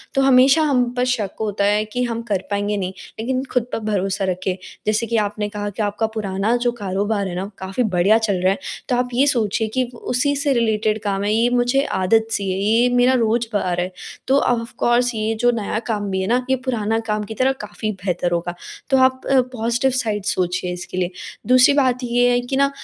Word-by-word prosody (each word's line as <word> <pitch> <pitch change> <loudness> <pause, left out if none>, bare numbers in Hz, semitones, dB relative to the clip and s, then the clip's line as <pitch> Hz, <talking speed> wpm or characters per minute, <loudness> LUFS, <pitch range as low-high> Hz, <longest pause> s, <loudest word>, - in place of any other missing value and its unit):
तो 270 - +3
हमेशा 270 +3 +5
हम 255 -5 +2
पर 250 - +2
शक 210 -6 -3
होता 205 -2 0
है 210 +1 +2
कि 245 +4 -3
हम 230 -1 -2
कर 190 -2 0
पाएँगे 205 +1 0
नहीं, 190 -1 -3 0.3
लेकिन 255 +3 -1
ख़ुद 245 -2 0
पर - - -1
भरोसा 195 0 -1
रखें। 185 0 -2 0.3
जैसे 215 +2 +1
कि 230 - 0
आपने 210 0 -1
कहा 205 -1 -4
कि 205 - -5
आपका 205 +2 -1
पुराना 205 +1 0
जो 240 0 0
कारोबार 200 -1 -2
है 175 - -5
ना, 190 +3 -4
काफ़ी 190 +6 -2
बढ़िया 195 0 +3
चल 220 -3 0
रहा 185 - +4
है, 195 - -1 0.3
तो 250 - +2
आप 250 0 0
ये 260 +4 +3
सोचिए 225 -4 +1
कि 260 - +2
वो - - -12
उसी 285 +4 0
से 280 0 +1
रिलेटेड 220 -2 +1
काम 200 -1 -1
है, 205 - 0
ये 230 +2 +3
मुझे 245 +2 +2
आदत-सी 205 +1 +1
है, 185 - -2
ये 225 +5 +3
मेरा 245 +1 +4
रोज़गार 225 -6 0
है। 180 +1 -3 0.4
तो 270 +1 +4
ऑफकोर्स 240 0 +1
ये 220 +1 -1
जो 245 - +5
नया 215 -2 -2
काम 205 -3 -2
भी 190 - -1
है 190 - -2
ना 245 +3 +1
ये 265 - +4
पुराना 225 -3 0
काम 210 -1 -1
की 210 - -7
तरह 260 +4 +2
काफ़ी 215 +1 -4
बेहतर 180 -2 -1
होगा। 175 0 -1 0.4
तो 270 - +4
आप 260 0 +3
अ, 270 - +6
पॉज़िटिव 245 +1 -1
साइड 215 -6 -1
सोचिए 180 -2 -1
इसके 180 +1 -7
लिए। 180 0 0 0.4
दूसरी 255 +2 +6
बात 260 -3 +2
ये 245 0 +2
है 245 - +3
कि 245 +2 -3
न 275 - +4
220 Hz, 220 wpm, -20 LUFS, 200-245 Hz, 0.4 s, अ